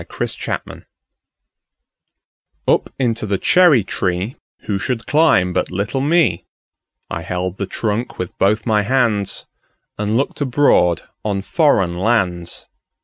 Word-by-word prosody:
Foreign - - -4 0.3
Lands - - -32 1.8
UP - - +2
into 115 -4 -1
the 100 -1 0
cherry 155 - +5
treeWho 95 +4 -2 0.5
should 125 -3 -2
climb 140 - +3
but - - 0
little 100 +8 -2
me?I 145 - -2
held 90 +2 -3
the 100 - -3
trunk 110 +4 -3
with 90 - -5
both 105 +3 +2
my 105 -3 +2
handsAnd 115 -5 0 0.5
looked 110 +8 -1
abroad 120 - +3 0.2
on 100 -2 -2
foreign 95 - +2
lands. 90 -6 0
105 Hz, 110 wpm, -19 LUFS, 90-130 Hz, 1.8 s, cherry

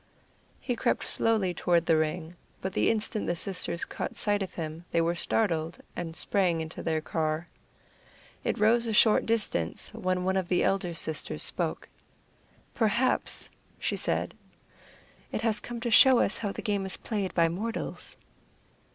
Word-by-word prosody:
He 245 - -2
crept - - 0
slowly 215 -5 +1
toward 170 0 +2
the 165 - +4
ring; 160 +2 -1 0.2
but 190 0 -4
the - - +2
instant 215 -1 -1
the 175 - 0
sisters 180 -1 -1
caught - - -5
sight 205 -1 +1
of 190 -1 -5
him 160 0 -5
they 170 - +1
were 165 +1 +2
startled, 170 -3 0 0.2
and 165 -2 -5
sprang 175 +1 +1
into 160 0 -6
their 160 -1 -1
car. 155 +1 -2 1.0
It - - -1
rose 230 +3 +3
a 225 - -1
short 215 +1 +5
distance 210 - 0
when 185 0 -1
one 190 +1 +1
of 185 -2 -1
the 180 - +2
elder 185 -3 0
sisters 160 -1 -1
spoke: - - -2 0.9
"Perhaps," 235 +3 +1 0.3
she - - -1
said, - - 0 1.0
"it - - -2
has 225 -1 +1
come 240 -1 -6
to 235 -1 -2
show 260 +3 +8
us 210 - +2
how 205 -3 -2
the - - -7
game 205 -3 0
is 190 - -1
played 205 -5 -3
by 170 -1 +4
mortals." 215 +8 -4
185 Hz, 160 wpm, -28 LUFS, 165-215 Hz, 1.0 s, show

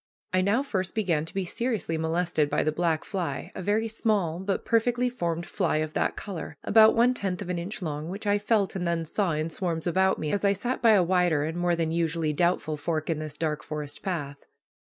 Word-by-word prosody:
I 185 - +4
now 205 +8 +2
first 190 -9 -3
began 170 -8 +1
to - - -8
be 195 -1 0
seriously 220 -4 -2
molested 160 -1 0
by - - +1
the 155 - +1
black 160 0 0
fly, 185 -4 -4
a - - -6
very 210 +4 +1
small 205 -7 0
but 190 +1 -2
perfectly 245 +2 +2
formed 170 -7 -2
fly - - 0
of 155 0 -2
that - - 0
color, 165 -7 -6
about 220 0 +6
one 240 +2 +4
tenth 195 -6 -2
of 195 - -6
an 175 - -2
inch 185 +3 -5
long, 155 0 -4
which 200 +4 -5
I 205 0 +3
felt, 205 -2 +1
and 180 -2 -2
then 170 -1 0
saw, 180 +1 0
in 155 +2 -2
swarms 165 -2 -2
about 190 +2 +2
me, 155 - -2
as 205 - 0
I 200 0 +4
sat 240 +6 -3
by 230 -2 +6
a 195 -3 +5
wider 175 -4 +2
and 160 +2 -3
more 175 0 +1
than 165 -1 -1
usually 165 -2 0
doubtful 155 -2 +1
fork 155 +1 -2
in 155 - -1
this 155 -1 -6
dark 155 -2 -1
forest 150 -2 -6
path. 145 -7 -4
175 Hz, 225 wpm, -27 LUFS, 160-200 Hz, -, about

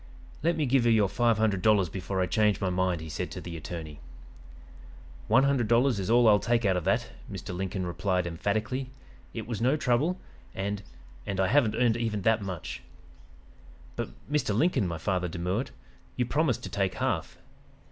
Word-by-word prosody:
"'Let 170 +1 +1
me 155 - +1
give 125 -2 +3
you - - +5
your 110 -3 +4
five 115 +2 +2
hundred 105 -4 +1
dollars 105 -3 +4
before 95 +2 -3
I - - +3
change 105 +2 +2
my 95 -1 0
mind,' 90 -2 0
he 80 - -7
said 75 -4 -4
to - - -7
the 85 -1 -7
attorney. 80 -2 -7 1.3
"'One 125 +5 +5
hundred 140 -5 +2
dollars 120 0 +3
is 95 - -3
all 120 0 +5
I'll 105 -1 +6
take 120 -1 +1
out 95 -2 +3
of 90 -3 -2
that,' - - +1 0.2
Mr. 90 - -6
Lincoln 95 0 -3
replied 90 +1 -1
emphatically. 105 +9 -2 0.5
'It - - -4
was 115 -2 -4
no 130 +5 +3
trouble, 145 +7 +1 0.4
and 100 +1 -2 0.5
and 95 -1 -2
I 95 -1 +2
haven't 120 -5 +3
earned 120 -1 +2
even 110 -4 -2
that 110 +1 +3
much.' 80 -11 -5 1.1
"'But - - -3 0.2
Mr. 145 -8 0
Lincoln,' 155 - +2
my 85 -1 -3
father 90 +1 -1
demurred, 90 +8 -2 0.5
'you 125 - 0
promised 140 0 0
to - - -5
take 95 -3 -1
half.' - - -2
105 Hz, 185 wpm, -28 LUFS, 90-120 Hz, 1.3 s, I'll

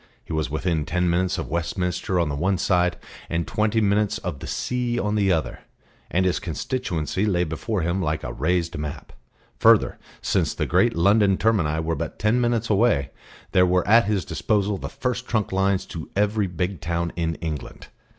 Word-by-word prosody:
He - - -6
was 80 -1 -1
within 80 +1 -1
ten 90 +2 0
minutes 90 +1 +1
of 80 - -4
Westminster 90 +2 -1
on 85 - +2
the 70 - -2
one 95 +6 +1
side, 90 -1 +1 0.3
and 85 0 -1
twenty 110 +1 +1
minutes 105 -1 +2
of 90 -7 -5
the - - -7
sea 125 -1 -1
on 105 -3 0
the 100 -2 +2
other, 75 -9 -1 0.5
and 95 +1 +1
his 90 - +1
constituency 85 - -2
lay 90 -4 +2
before 90 +6 -2
him 85 +3 0
like 80 -2 -1
a - - -4
raised 85 +5 0
map. 75 -1 -6 0.5
Further, - - +4 0.2
since - - 0
the - - -1
great - - +2
London 100 +3 +4
termini 85 -9 +1
were 80 +1 -1
but 80 -1 -4
ten 110 +4 +2
minutes 120 -2 +1
away, 100 - +2 0.4
there 90 - +5
were 90 0 +2
at 115 +2 +6
his 100 -5 0
disposal 100 +1 0
the - - -5
First 125 -1 -3
Trunk 110 -4 0
lines 95 0 +1
to 80 -2 -8
every 105 0 +1
big 90 -1 -3
town 85 +1 -2
in 80 -2 -1
England. 80 -4 -6
90 Hz, 185 wpm, -24 LUFS, 80-105 Hz, 0.5 s, at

